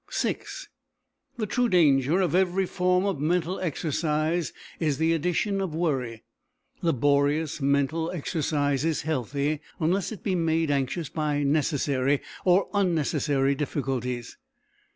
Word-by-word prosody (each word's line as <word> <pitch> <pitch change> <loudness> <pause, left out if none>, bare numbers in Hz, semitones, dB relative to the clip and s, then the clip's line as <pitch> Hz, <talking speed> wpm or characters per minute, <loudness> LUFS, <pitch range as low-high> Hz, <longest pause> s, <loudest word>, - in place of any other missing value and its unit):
VI - - 0 1.0
The 220 - -1
true 245 +3 +1
danger 155 - +4
of 175 -5 0
every 190 +1 +2
form 180 +1 +1
of 195 -8 -1
mental 175 +3 0
exercise 155 0 -1 0.3
is 150 -5 0
the 160 +2 +2
addition 180 +5 0
of 180 -5 -3
worry. 130 -9 -1 0.6
Laborious 145 +1 +1
mental 140 +4 +1
exercise 145 -4 -1
is 160 -1 0
healthy 145 0 -1 0.2
unless 180 +6 0
it 215 - -8
be 195 - 0
made 165 -3 +1
anxious 140 +4 -1
by 150 -2 -1
necessary 140 -2 +1 0.2
or 185 +2 +4
unnecessary 150 -7 +1
difficulties. 130 -4 -3
155 Hz, 120 wpm, -26 LUFS, 140-175 Hz, 1.0 s, danger